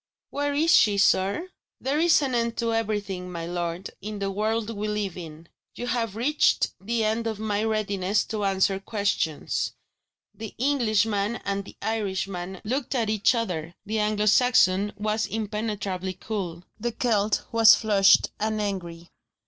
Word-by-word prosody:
"Where 285 0 -1
is 320 +4 +3
she, 205 -2 +5
sir?" 200 - +2 0.3
"There 275 +3 -1
is 330 -2 +4
an 265 -2 -1
end 235 -1 0
to 230 -1 0
everything, 205 -5 -2
my 170 -1 -5
lord, 175 0 -4
in 210 +1 -5
the 195 -1 -2
world 220 +2 -1
we 210 +1 -3
live 210 -3 -2
in. 165 -2 -9 0.3
You 245 - -5
have 230 -4 -1
reached 285 +7 +2
the 225 +3 -1
end 220 +2 0
of 220 -2 -3
my 210 -1 -1
readiness 205 -2 0
to 215 -2 -3
answer 195 0 +1
questions." 200 -7 -1 0.6
The 220 -1 -8
Englishman 225 -5 +1
and 200 0 -2
the - - -12
Irishman 190 -4 -3
looked 260 +4 -2
at 225 -4 +1
each 215 +3 +3
other: 175 -7 -3
the 215 +1 -1
Anglo 210 0 +1
Saxon 205 -4 +4
was 215 +1 -1
impenetrably 210 -4 -3
cool; 180 -5 -5 0.2
the 235 +2 -2
Celt 215 -4 +1
was 225 -2 +8
flushed 205 -3 +4
and 215 0 -1
angry. 175 -5 -4
210 Hz, 155 wpm, -25 LUFS, 195-225 Hz, 0.6 s, was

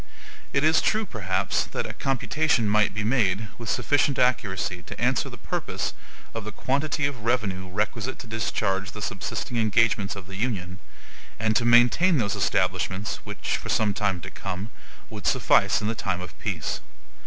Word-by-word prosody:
It 140 - +1
is 155 0 +5
true, 215 0 +1
perhaps, 100 - 0
that - - -4
a - - -5
computation 135 -2 +1
might 105 0 +3
be 105 - -1
made 110 -3 +1
with 115 -2 -5
sufficient 145 -1 +2
accuracy 100 -8 +1
to - - -7
answer - - +1
the - - -10
purpose - - -3 0.4
of 115 - -4
the 110 - -5
quantity 140 +6 0
of 135 -6 -3
revenue 100 -6 0
requisite 105 +5 -2
to - - -9
discharge 100 -3 -1
the 105 - -7
subsisting 120 - -3
engagements 110 -2 +2
of 100 -2 -8
the 95 0 -8
Union, 95 -5 -2 0.6
and 110 0 +1
to 115 - +3
maintain 120 +9 +5
those 105 -5 0
establishments 100 +4 0
which, 105 -1 -2
for - - -8
some 105 -2 +2
time 100 -4 0
to - - -7
come, 100 +3 -5 0.4
would - - -4
suffice 105 - +3
in 110 +2 0
time 90 - -2
of 90 - -8
peace. - - -2
110 Hz, 165 wpm, -26 LUFS, 100-125 Hz, 0.6 s, is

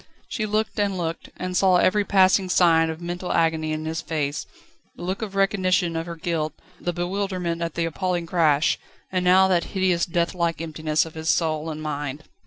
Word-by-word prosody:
She 215 -3 -2
looked 215 +1 -1
and 200 -2 +1
looked: 165 -1 -4
and 180 0 -4
saw 185 0 +4
every 205 +3 +3
passing 190 -1 +4
sign 165 -3 +4
of 160 +1 -6
mental 175 +1 -4
agony 160 -1 +1
on 155 0 -3
his 160 0 -3
face: 150 -2 -3 0.5
the - - -9
look 185 +4 -3
of 205 -3 -5
recognition 185 -3 +2
of 165 +1 -3
her 170 - -5
guilt, 160 -2 -2 0.3
the 175 - -2
bewilderment 180 -1 -2
at 165 -2 -3
the 170 - 0
appalling 175 +1 -2
crash, 160 -3 +2 0.3
and 185 -1 0
now 185 +1 +6
that 175 -2 +3
hideous 185 -3 +2
deathlike 170 0 0
emptiness 155 -1 0
of 160 - -10
his 160 0 -3
soul 160 -1 +1
and 155 0 -6
mind. 145 -1 -4
170 Hz, 190 wpm, -24 LUFS, 160-185 Hz, 0.5 s, now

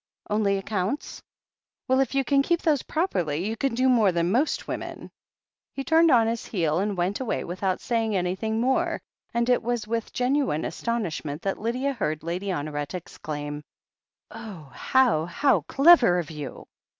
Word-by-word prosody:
"Only 205 -2 +2
accounts? 195 +6 -3 0.7
Well, 260 +1 +3
if 270 0 0
you 275 - +3
can 275 +1 +3
keep 340 +4 0
those 300 -4 +2
prop 345 +4 -1
erly 160 -1 -1
you 220 +2 -2
can 270 -1 -1
do 255 +2 +2
more 225 -6 +4
than 170 +1 0
most 270 +8 0
women." - - -6 0.6
He 275 - -3
turned 325 +2 +4
on 235 -5 +5
his 230 0 -2
heel 165 -5 0
and 200 0 -1
went 180 +3 0
away 260 -4 -2
without 185 +2 -2
saying 225 -2 0
an3rthing 190 +4 -1
more, 260 +3 +1 0.3
and 235 0 0
it 250 -1 +3
was 240 -2 -2
with 230 0 -2
genuine 250 - 0
astonishment 170 -8 -3
that 195 - -2
Lydia 250 +5 -1
heard 155 - -2
Lady 175 +4 -3
Honoret 145 -3 -3
exclaim: 150 -4 -6 0.7
"Oh, 175 -11 -9
how, 245 -12 +2
how 275 +11 +2
clever 275 - +6
of 165 -3 -3
you 145 -5 -7
215 Hz, 165 wpm, -25 LUFS, 175-255 Hz, 0.7 s, clever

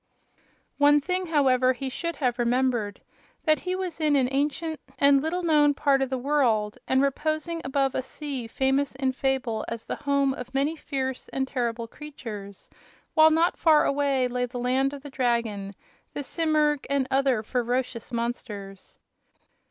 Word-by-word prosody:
One 290 +1 +6
thing, 365 +5 -2
however, 260 -5 +3
he 265 +2 -5
should 335 +6 -3
have 250 -4 -1
remembered: 240 -4 0 0.4
that 310 -1 +3
he 365 0 -2
was 365 -4 -4
in 300 -2 +3
an 265 -2 +3
ancient 300 +3 -1 0.2
and 280 -1 +5
little 345 +4 -2
known 295 -3 +4
part 275 -1 +2
of 270 - 0
the 260 - -1
world 245 -5 +1
and 260 +1 +3
reposing 310 +4 -1
above 270 0 0
a - - 0
sea 265 -2 -5
famous 270 +3 0
in 265 0 0
fable 260 -4 -1
as 230 -1 -6
the - - -4
home 280 -1 +1
of 250 0 -9
many 285 +4 +1
fierce 265 -4 -4
and 265 0 -2
terrible 235 -3 -2
creatures; 225 -9 -9 0.5
while 315 0 +7
not 325 +2 +2
far 310 -2 +5
away 275 -2 +1
lay 250 0 -1
the 245 +1 -7
land 260 +2 +1
of 285 -1 -9
the 285 - -9
dragon, 230 -6 -1 0.4
the 290 - -4
simurg 305 -2 +1
and 280 -2 +1
other 265 -4 +2
ferocious 245 +1 -2
monsters. 215 -5 -5
270 Hz, 160 wpm, -26 LUFS, 245-295 Hz, 0.5 s, while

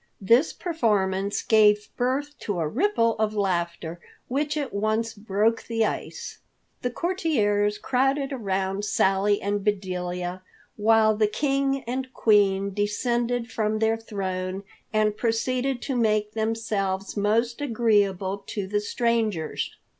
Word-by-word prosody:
This 235 +10 +4
performance 205 - 0
gave 210 -1 +4
birth 270 +4 -1
to 200 -4 -3
a 160 - 0
ripple 230 - +1
of 215 0 0
laughter, 170 -4 -1 0.3
which 290 +4 -1
at 285 -3 -3
once 215 +2 0
broke 215 +2 0
the 225 -1 +1
ice. - - -5 0.4
The 250 - -1
courtiers 225 - 0
crowded 270 +2 0
around 195 -4 -2
Sally 200 0 +2
and 205 0 -2
Bedelia, 180 -2 -2 0.3
while 220 0 +4
the 215 0 +3
King 275 +2 0
and 255 +2 -4
Queen 200 -2 +3
descended 235 +3 -1
from 215 -1 0
their 220 +1 +2
throne 190 -3 -4 0.3
and 215 -1 +2
proceeded 250 +3 -1
to 270 - -2
make 215 -3 +1
themselves 215 -3 -2
most 230 +5 +1
agreeable 205 -6 +1
to 205 -3 -3
the 205 +2 0
strangers. 215 -7 -1
215 Hz, 125 wpm, -25 LUFS, 200-240 Hz, 0.4 s, This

